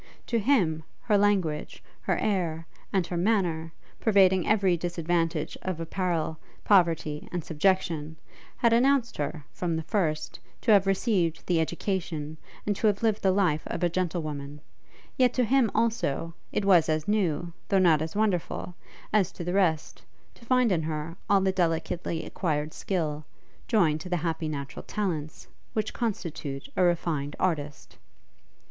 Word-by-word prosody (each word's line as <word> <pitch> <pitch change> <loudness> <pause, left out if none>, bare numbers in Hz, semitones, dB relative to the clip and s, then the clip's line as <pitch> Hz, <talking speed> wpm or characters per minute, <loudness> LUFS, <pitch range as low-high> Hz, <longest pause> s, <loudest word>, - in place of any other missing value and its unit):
To 235 - 0
him, 190 - +2 0.2
her 210 - +2
language, 195 -7 +1 0.2
her - - 0
air, 170 -6 -1 0.3
and 190 -3 +1
her 175 - -4
manner, 175 -5 +1 0.3
pervading 190 -4 +4
every 195 -4 +3
disadvantage 170 -1 -1
of 185 -3 -3
apparel, 165 -2 -2 0.2
poverty, 165 -6 +2
and 175 -2 -3
subjection, 160 -2 0 0.4
had 235 -1 +3
announced 255 0 +3
her, 150 +1 -3
from 170 -2 -2
the 160 - -2
first, 155 -4 -1 0.2
to 230 - +2
have 200 -2 +5
received 190 -5 +1
the 175 -2 +2
education, 160 -2 -2 0.3
and 205 - 0
to 220 - +2
have 205 +1 +1
lived 220 -2 +2
the 190 - +3
life 185 -5 +2
of 175 - -4
a 175 - +3
gentlewoman; 155 -5 -3 0.6
yet 250 -2 +3
to 255 - +3
him, 250 -1 +3
also, 210 -8 0 0.2
it 205 - -1
was 175 -5 +5
as 155 -1 0
new, 175 -5 0 0.2
though 195 - +3
not 170 -5 +5
as 160 +2 -4
wonderful, 195 -4 -1 0.4
as 195 -4 +3
to 175 - -7
the 175 +1 -2
rest, 170 -6 +1 0.3
to - - -19
find 250 -2 +3
in 170 -3 +2
her 155 +1 -4
all 200 -1 +5
the 190 0 +2
delicately 170 -2 -1
acquired 155 -4 -2
skill, 155 -5 -2 0.4
joined 160 -9 +2
to 180 - -7
the 180 - +1
happy 160 -1 -1
natural 140 -2 -5
talents, 165 -8 -4 0.3
which 215 -1 -1
constitute 165 - -4
a - - +1
refined 165 -5 +1
artist. 150 -5 -2
175 Hz, 155 wpm, -27 LUFS, 160-200 Hz, 0.6 s, have